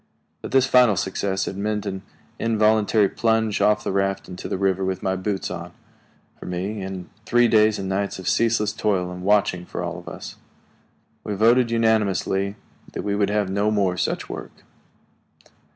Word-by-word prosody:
But - - -6
this 135 0 +4
final 125 -5 +5
success 95 +1 -1
had 95 - -5
meant 105 0 -2
an 95 -1 -4 0.4
involuntary 110 -2 +3
plunge 110 -1 0
off 105 0 +3
the - - -2
raft 95 0 -1
into 90 0 -7
the - - -1
river 95 0 +1
with 95 0 -2
my 95 0 0
boots 95 0 -3
on, 85 -1 -7 0.7
for - - -9
me, 95 +4 -3
and 95 -2 -6 0.2
three 120 0 +4
days 110 -1 +4
and 95 - -4
nights 100 +1 -2
of 95 - -8
ceaseless 115 -2 +2
toil 95 -5 0
and 90 0 -7
watching 95 -2 +2
for - - -5
all - - -4
of - - -16
us. - - -9 0.9
We 105 - -3
voted 115 +4 +4
unanimously 105 -4 +1 0.4
that - - -4
we 100 - -1
would 100 -1 +1
have 105 -2 0
no 100 +2 +1
more 100 -4 +1
such 90 - -2
work. - - -9
100 Hz, 175 wpm, -23 LUFS, 95-110 Hz, 0.9 s, final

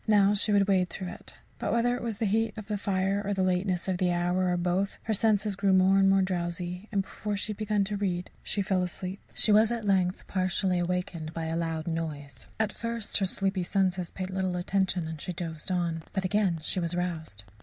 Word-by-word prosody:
Now 205 -2 +5
she 210 +1 +3
would 200 -1 +4
wade 185 -2 +3
through 185 +1 -5
it. - - -11 0.2
But - - -1
whether 240 +1 +2
it 245 - -5
was 230 -3 -3
the 225 - 0
heat 220 +2 +1
of 215 - -6
the 210 -1 -2
fire, 195 0 0
or 205 0 -1
the 190 - +1
lateness 180 -1 0
of 185 -2 0
the 180 -1 +2
hour, 180 +1 +1
or 175 - +1
both, 180 +3 0
her 220 - 0
senses 210 -1 +2
grew 195 0 +2
more 190 +1 +5
and 195 0 +5
more 195 0 +4
drowsy, 180 +1 -3
and 200 -2 +1
before 205 +2 -4
she 215 - -3
had 205 - -6
begun 210 -2 +1
to 205 +1 -2
read, 180 -3 -2
she 200 - -1
fell 190 -1 +1
asleep. 180 +2 -4 0.2
She 215 - +5
was, 215 +2 +5
at 230 -2 -2
length, 185 -2 +1
partially 185 -1 0
awakened 175 -2 -2
by 165 -1 -2
a 160 0 -2
loud 165 -1 -2
noise. 155 -4 -4
At 220 -1 +1
first 230 -2 -1
her 195 - +3
sleepy 195 0 0
senses 185 -1 0
paid 185 0 -5
little 185 -1 -1
attention 180 -1 0
and 160 -2 -6
she 180 - -4
dozed 165 -2 -5
on. 170 -3 0
But 190 -1 -1
again 190 -3 +2
she 185 - -1
was 170 0 0
roused. 160 - -3
190 Hz, 230 wpm, -28 LUFS, 175-205 Hz, 0.2 s, Now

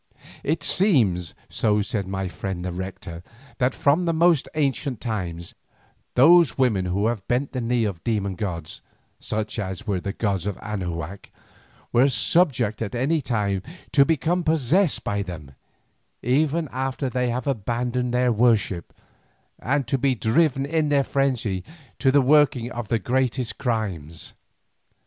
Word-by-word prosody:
It 160 +3 -1
seems, 110 - +2
so 105 -2 +1
said 105 -4 -3
my 95 0 -3
friend 90 0 -5
the 90 - -2
Rector, 90 -1 -7 0.4
that 125 0 +1
from 150 +5 +2
the 165 -1 0
most 165 -3 +3
ancient 140 -4 -1
times, 90 -7 -4 0.6
those 165 +4 +6
women 110 -8 +2
who 95 +3 0
have 110 -4 -2
bent 130 +3 0
the 130 - -3
knee 120 0 +1
to 100 - -1
demon 105 -4 -1
gods, 85 -5 -5 0.4
such 110 +1 -3
as 95 +2 -4
were 100 -5 -1
the 100 - -3
gods 100 -4 -1
of 100 - -3
Anahuac, 90 -3 -5 0.6
are 125 +4 +5
subject 120 - +2
at 110 +2 -3
any 145 +6 +1
time 105 -7 -1 0.3
to 140 - +6
become 165 +4 0
possessed 160 +3 +2
by 100 0 -1
them, 85 -7 -7 0.7
even 150 +6 +1
after 130 +1 -2
they 125 0 -1
have 120 +1 -2
abandoned 125 0 -1
their 125 0 +2
worship, 110 -6 +1 0.6
and 135 +3 0
to 135 +3 -1
be 135 0 +2
driven 135 +4 +2
in 155 0 0
their 140 -1 +3
frenzy 125 -10 -1 0.4
to 135 - +3
the 140 +1 +5
working 130 -3 +3
of 120 -3 -5
the 115 - +1
greatest 125 0 -1
crimes. 95 - -3
120 Hz, 150 wpm, -24 LUFS, 100-140 Hz, 0.7 s, those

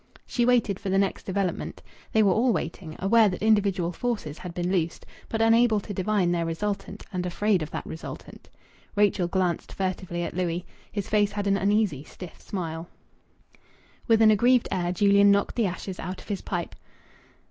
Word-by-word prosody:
She 240 -1 0
waited 235 -6 +2
for 200 - -4
the 190 - +2
next 195 0 0
development. 190 -1 -2 0.3
They 220 - +4
were 200 - +4
all 235 +6 +3
waiting, 165 -2 -4
aware 215 +2 +4
that 185 - -5
individual 200 -5 +2
forces 205 -8 -3
had 180 - -6
been 175 +1 -2
loosed, 170 -3 -1 0.2
but 225 0 0
unable 225 -1 +4
to 205 +1 -7
divine 190 -1 +1
their 170 -1 0
resultant, 200 +4 -4
and 180 -1 -1
afraid 190 +1 +1
of 155 - -4
that - - -5
resultant. 160 - -9 0.5
Rachel 200 -3 +2
glanced 180 -1 -1
furtively 185 -2 -3
at - - -4
Louis. 175 -1 -2 0.3
His 205 -2 -3
face 210 -1 +2
had 205 -1 -2
an 200 0 +3
uneasy, 200 -7 +1
stiff 180 +1 -11
smile. 165 -3 -5 1.2
With 225 -1 +5
an 215 - +7
aggrieved 240 +3 +4
air 175 -1 0
Julian 200 +2 +5
knocked 200 0 +2
the 230 -4 +2
ashes 185 +1 -6
out 185 +3 -5
of - - -14
his 200 -2 -2
pipe. 175 -2 -4
195 Hz, 180 wpm, -26 LUFS, 175-210 Hz, 1.2 s, an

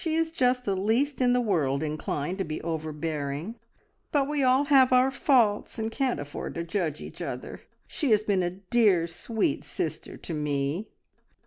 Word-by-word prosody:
She 320 -1 0
is 325 0 +1
just 250 -4 +1
the 195 - 0
least 235 +9 +1
in 245 -1 +4
the 250 - +3
world 155 - +1
inclined 155 +3 -3
to - - +1
be 155 -3 -4
overbearing, 155 +1 -3 0.6
but 280 -2 +2
we 295 -1 -1
all 260 +1 +4
have 270 -3 +5
our 255 +1 +5
faults, 245 -8 +2
and 220 0 -2
can't 260 - 0
afford 145 0 -6
to 170 - -2
judge 165 -3 -2
each - - -9
other. - - -6 0.2
She 290 - -2
has 215 -1 +4
been 200 -3 +1
a 175 - 0
dear 195 -1 +2
sweet 205 +6 -2
sister - - -4
to 170 - -6
me!" 150 +5 -1
205 Hz, 180 wpm, -27 LUFS, 160-255 Hz, 0.6 s, have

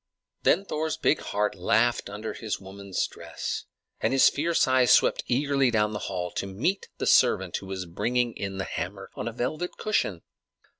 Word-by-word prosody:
Then 195 +4 +3
Thor's 155 -2 -2
big 155 - +2
heart 105 0 -1
laughed 110 +5 +1
under 105 +2 -5
his 110 -3 -4
woman's 95 0 -3
dress, - - -5 0.3
and - - +1
his 135 - +7
fierce 165 +1 +1
eyes 130 -1 +4
swept - - +5
eagerly 140 +1 +2
down 105 -2 +1
the 105 - -3
hall 90 -2 -3
to 100 - -2
meet 125 - -1
the - - -2
servant - - +4
who 95 - -9
was 95 -1 -4
bringing 120 +7 0
in 95 -1 -4
the 95 - -1
hammer 95 +2 -5
on 105 - -5
a - - -2
velvet 155 +9 -3
cushion. 105 - -1
110 Hz, 180 wpm, -27 LUFS, 95-135 Hz, 0.3 s, his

